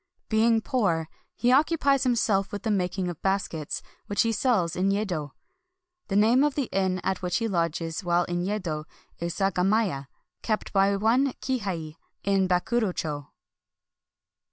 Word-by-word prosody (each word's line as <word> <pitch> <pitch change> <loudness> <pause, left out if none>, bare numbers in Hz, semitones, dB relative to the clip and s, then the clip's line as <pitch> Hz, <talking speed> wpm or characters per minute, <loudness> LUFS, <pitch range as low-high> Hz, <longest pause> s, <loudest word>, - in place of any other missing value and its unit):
Being 225 +1 +3
poor, 175 - 0 0.3
he 245 - +1
occu 300 +5 +4
pies 275 -2 +3
himself 215 -5 +1
with 205 - -5
the 220 - 0
making 185 -1 0
of 175 -3 -6
baskets, 190 -6 -2 0.2
which 205 - +2
he 230 - +1
sells 200 -7 +1
in 190 +2 +1
Yedo. 185 -8 -2 0.7
The 195 - -2
name 225 +6 +5
of 295 -2 +1
the 275 -5 -1
inn 190 -1 +1
at 190 -1 -1
which 180 -1 0
he 230 - -1
lodges 165 -2 -1
while 175 0 +2
in 175 0 -2
Yedo 180 -6 -2 0.3
is 170 +1 -3
Sagamiya, 195 - +1 0.3
kept 215 -2 -2
by 195 0 +4
one 240 +6 +2
Kihei, 185 - -3 0.3
in 195 -1 +2
Bakuro 205 +4 +1
cho. 145 -3 -4
195 Hz, 155 wpm, -26 LUFS, 175-225 Hz, 0.7 s, name